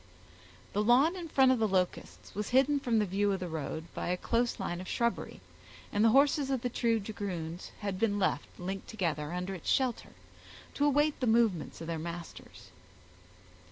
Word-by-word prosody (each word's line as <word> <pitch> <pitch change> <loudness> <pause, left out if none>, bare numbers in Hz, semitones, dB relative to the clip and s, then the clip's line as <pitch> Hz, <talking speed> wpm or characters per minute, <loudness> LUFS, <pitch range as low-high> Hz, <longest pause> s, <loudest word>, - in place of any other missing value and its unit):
The 205 - +1
lawn 260 - +4
in 350 -2 -6
front 265 -3 +5
of 255 - +2
the 220 - +3
Locusts 185 -2 -2
was 210 +1 -3
hidden 270 +3 +4
from 240 -4 +1
the 210 - +3
view 200 +2 +1
of 190 - -2
the 180 - -4
road 160 0 -4
by - - -4
a 180 +1 0
close 235 +5 0
line 175 +1 -3
of 185 - -9
shrubbery, 235 0 -2 0.5
and 205 - +2
the 225 - +6
horses 275 +2 +4
of 265 -3 0
the 245 - -1
two 230 -2 +1
dragoons 185 -5 -5
had 200 -2 -3
been 210 -2 +1
left, 190 -2 0
linked 190 +2 -5
together, 160 -8 -2
under 180 +2 -3
its 180 - -5
shelter, 255 -3 0 0.6
to 290 - +1
await 295 +1 +2
the 255 - 0
movements 220 -9 +2
of - - -5
their 165 -1 -3
masters. 170 - -8
210 Hz, 190 wpm, -31 LUFS, 180-245 Hz, 0.6 s, the